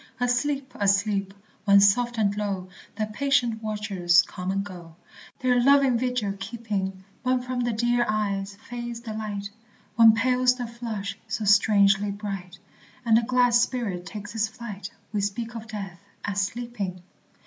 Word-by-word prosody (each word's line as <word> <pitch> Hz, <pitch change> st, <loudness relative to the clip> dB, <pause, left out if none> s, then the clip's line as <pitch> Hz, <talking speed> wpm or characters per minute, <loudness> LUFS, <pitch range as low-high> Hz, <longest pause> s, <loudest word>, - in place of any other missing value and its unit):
Asleep! 260 Hz, +3 st, 0 dB
asleep! 200 Hz, -1 st, +1 dB, 0.3 s
when 200 Hz, -1 st, +7 dB
soft 235 Hz, +4 st, +3 dB
and 205 Hz, -2 st, +2 dB
low 200 Hz, -3 st, -3 dB, 0.3 s
The 215 Hz, 0 st, -1 dB
patient 240 Hz, 0 st, 0 dB
watchers 195 Hz, -5 st, +2 dB
come 180 Hz, 0 st, -6 dB
and 195 Hz, +1 st, 0 dB
go, 175 Hz, -5 st, -10 dB, 0.4 s
Their 250 Hz, -2 st, +2 dB
loving 275 Hz, -1 st, +5 dB
vigil 245 Hz, -4 st, -1 dB
keeping; 195 Hz, -4 st, -4 dB, 0.2 s
When 255 Hz, 0 st, +1 dB
from 250 Hz, 0 st, -4 dB
the 240 Hz, -1 st, 0 dB
dear 240 Hz, +2 st, +2 dB
eyes 200 Hz, -2 st, -1 dB
fades 240 Hz, -1 st, -5 dB
the 225 Hz, -2 st, -6 dB
light, 205 Hz, -2 st, -4 dB, 0.5 s
When 225 Hz, -1 st, +8 dB
pales 250 Hz, +2 st, +3 dB
the 245 Hz, -1 st, -4 dB
flush 220 Hz, -4 st, -5 dB
so 220 Hz, 0 st, -3 dB
strangely 200 Hz, -1 st, +4 dB
bright, 195 Hz, -3 st, -6 dB, 0.5 s
And 225 Hz, -1 st, +5 dB
the 230 Hz, -, +5 dB
glad 245 Hz, 0 st, +2 dB
spirit 230 Hz, -7 st, +1 dB
takes 210 Hz, -1 st, -7 dB
its 220 Hz, -1 st, +1 dB
flight, 215 Hz, -4 st, -8 dB, 0.2 s
We 205 Hz, -, 0 dB
speak 230 Hz, +4 st, -3 dB
of 225 Hz, -1 st, -7 dB
death 195 Hz, -5 st, -7 dB, 0.3 s
as 200 Hz, -1 st, 0 dB
"sleeping." 200 Hz, -4 st, -4 dB
215 Hz, 150 wpm, -26 LUFS, 200-240 Hz, 0.5 s, When